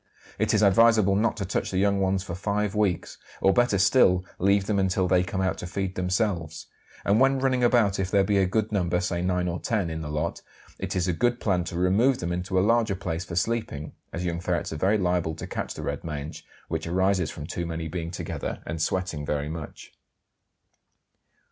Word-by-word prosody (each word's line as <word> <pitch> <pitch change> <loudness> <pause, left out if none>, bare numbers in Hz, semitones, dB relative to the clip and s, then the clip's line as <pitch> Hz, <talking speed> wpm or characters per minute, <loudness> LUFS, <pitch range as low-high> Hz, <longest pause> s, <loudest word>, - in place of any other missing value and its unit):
It - - +2
is 105 - +3
advisable 105 -1 +5
not 110 +3 +1
to 100 - -2
touch 95 - -2
the 95 - -2
young 100 +1 +2
ones 95 0 +1
for 90 - -6
five 100 +2 -1
weeks, 105 -5 -1 0.2
or 95 - +4
better 120 -3 +3
still 95 -2 +4
leave 100 +1 +3
them 100 -1 0
until 95 -1 +1
they 90 0 +4
come 95 +1 -2
out 95 0 -1
to 90 - -5
feed 95 +1 -3
themselves; 90 -3 -1 0.4
and 100 +3 +3
when 135 +1 +4
running 130 -1 +1
about, 115 -5 +3
if 95 -1 -1
there 100 0 +3
be 100 0 +2
a 95 - +3
good 110 +3 0
number, 90 -4 +1
say 90 -1 -2
nine 90 0 0
or 85 0 -2
ten, 100 -7 -1
in 80 0 -4
the 75 - -5
lot, 75 +3 -2 0.4
it - - -3
is 90 -1 0
a 90 - +1
good 120 +7 +1
plan 90 -4 +1
to 85 - -5
remove 105 +9 +3
them 85 0 -3
into 90 +2 -2
a 95 - +4
larger 115 -2 +2
place 90 -1 -4
for 85 - -6
sleeping, 100 -7 -2 0.2
as 90 +2 -4
young 85 -1 -2
ferrets 90 -2 -2
are - - -4
very 100 +7 +2
liable 90 -4 0
to - - -7
catch - - -4
the - - -6
red - - -3
mange, 75 -1 -6 0.2
which - - -3
arises 95 0 +1
from 75 - -7
too 85 +2 -4
many 80 0 -4
being 85 0 -4
together 85 - -5
and 80 +1 -4
sweating 90 -4 -1
very 75 0 -2
much. 80 -1 -8
95 Hz, 215 wpm, -26 LUFS, 85-100 Hz, 0.4 s, advisable